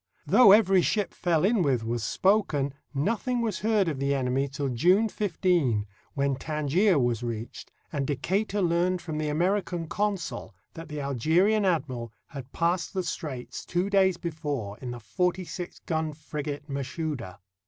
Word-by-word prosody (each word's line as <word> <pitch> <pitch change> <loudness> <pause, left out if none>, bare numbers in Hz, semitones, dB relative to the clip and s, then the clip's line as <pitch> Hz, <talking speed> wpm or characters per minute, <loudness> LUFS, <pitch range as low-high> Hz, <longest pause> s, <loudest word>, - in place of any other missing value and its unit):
Though 245 -6 +7
every 195 -3 +6
ship 205 +2 0
fell 170 -1 +1
in 215 0 +3
with 130 -7 +1
was 115 0 -2
spoken, 150 - +1 0.2
nothing 230 - 0
was 225 -5 -1
heard 210 -3 +2
of 150 -5 -2
the 140 +1 +1
enemy 135 +1 0
till 140 0 -3
June 180 - +3
15, 170 - +1 0.3
when 140 -1 +1
Tangier 155 +6 +2
was 120 -3 +1
reached, 115 -1 -6 0.2
and 140 -3 -1
Decatur 195 +8 0
learned 175 +1 +2
from 155 -3 -5
the 155 -1 -1
American 175 +2 0
consul 190 - -3 0.2
that 165 0 -9
the 150 -1 -4
Algerian 165 - +2
admiral 130 - -1 0.2
had 135 -2 -9
passed 170 +3 0
the 185 - 0
straits 145 -7 -5
two 185 +3 -1
days 190 -3 +4
before 145 -12 -4
in 125 - -6
the 120 0 -6
forty 180 - -1
six 180 +1 -6
gun 160 -2 -2
frigate 145 -1 -6
Mashouda. 140 - -4
160 Hz, 155 wpm, -27 LUFS, 135-185 Hz, 0.3 s, Though